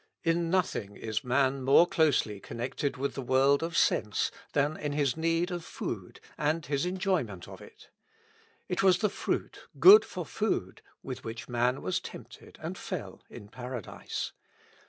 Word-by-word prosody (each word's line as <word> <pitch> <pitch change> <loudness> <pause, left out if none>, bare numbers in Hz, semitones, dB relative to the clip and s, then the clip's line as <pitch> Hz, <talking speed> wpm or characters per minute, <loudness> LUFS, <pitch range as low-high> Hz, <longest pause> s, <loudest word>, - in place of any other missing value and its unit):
In 165 0 +1
nothing 160 - 0
is 110 +4 -3
man 135 +1 +1
more 135 +6 +6
closely 145 - +1
connected 120 +6 -3
with 140 +2 -2
the 135 - -4
world 135 +2 +3
of 165 +1 -2
sense 105 -2 +2 0.2
than 145 +2 +1
in 150 -2 -3
his 145 -4 +1
need 165 +2 0
of 175 -2 -4
food, - - -6 0.2
and 150 +2 0
his 140 +4 0
enjoyment 180 - -1
gf - - -11
it. - - -15 0.8
It 180 - -1
was 190 -2 +5
the 210 +1 +1
fruit, - - -3
good 415 +3 +10
for - - -6
food, 440 - -2 0.2
with 130 -2 -6
which 115 +1 -6
man 125 +2 0
was 95 - 0
tempted - - -11
and - - -5
fell - - -6
in 100 - -11
Paradise. 125 0 -6
140 Hz, 155 wpm, -29 LUFS, 125-165 Hz, 0.8 s, good